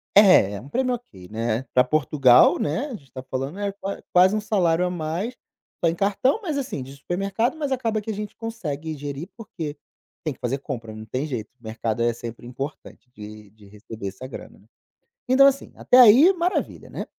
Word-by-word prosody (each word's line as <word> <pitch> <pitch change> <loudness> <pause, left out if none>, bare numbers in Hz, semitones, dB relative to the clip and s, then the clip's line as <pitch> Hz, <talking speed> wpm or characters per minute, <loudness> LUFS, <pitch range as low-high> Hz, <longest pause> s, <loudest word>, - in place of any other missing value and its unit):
É, 190 - +7
é 100 - -6
um 135 - -12
prêmio 255 - 0
ok, 95 - -13
né, 115 +2 -2
pra 125 - +6
Portugal, 135 -3 +5
né, 240 - -1
a 255 - -6
gente 135 - -15
tá 130 - -7
falando, 135 +7 -4
é 200 -1 -1
qua 200 0 -6
quase 185 +3 +6
um 215 - 0
salário 180 -5 +1
a - - 0
mais, 175 +7 -3 0.5
só 165 - +5
em 165 - -2
cartão, 205 - +1
mas 315 -8 -3
assim, 255 - -4
de 135 +2 -11
supermercado, 195 - -1
mas 290 -3 -3
acaba 225 -4 0
que 220 - -8
a - - -3
gente 210 +1 -6
consegue 160 -10 -5
gerir, 145 +5 -6
porque 170 -10 -6 0.5
tem 155 - -2
que - - -23
fazer 125 +3 -1
compra, 120 -6 -6
não 110 0 -9
tem 130 +6 -3
jeito, 120 -8 -5
mercado 115 0 -2
é 120 - +3
sempre 120 0 -8
importante 135 0 -8
de 105 -1 -11
de 105 -2 -19
receber 105 0 -7
essa 115 +7 -9
grana. - - -11 0.7
Então, 270 +2 +7
assim, 275 0 +2
até 255 - +4
aí 255 - +8
maravilha, 360 +1 -2
né, - - -5
155 Hz, 200 wpm, -24 LUFS, -, 0.7 s, aí